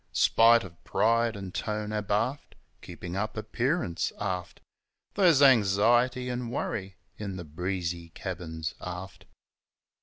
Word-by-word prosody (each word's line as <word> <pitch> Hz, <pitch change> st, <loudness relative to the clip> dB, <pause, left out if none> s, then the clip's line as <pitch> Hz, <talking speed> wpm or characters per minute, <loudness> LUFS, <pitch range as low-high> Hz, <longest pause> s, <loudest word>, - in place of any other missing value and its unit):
Spite 115 Hz, -1 st, +5 dB
o' 90 Hz, -, -9 dB
pride 115 Hz, 0 st, +2 dB
an' 95 Hz, -2 st, -7 dB
tone 105 Hz, +1 st, -3 dB
abaft 105 Hz, +6 st, -1 dB, 0.3 s
(Keepin' 90 Hz, 0 st, -7 dB
up 110 Hz, +3 st, -3 dB
appearance, 115 Hz, -, -1 dB
aft) 95 Hz, -3 st, -3 dB, 0.5 s
There's 170 Hz, -8 st, +5 dB
anxiety 120 Hz, +2 st, +4 dB
an' 125 Hz, -1 st, -3 dB
worry 95 Hz, -6 st, -4 dB, 0.2 s
in 100 Hz, -3 st, -4 dB
the 90 Hz, -2 st, -7 dB
breezy 85 Hz, +1 st, -3 dB
cabins 80 Hz, -3 st, -5 dB
aft. 90 Hz, +1 st, -7 dB
105 Hz, 115 wpm, -28 LUFS, 90-120 Hz, 0.5 s, Spite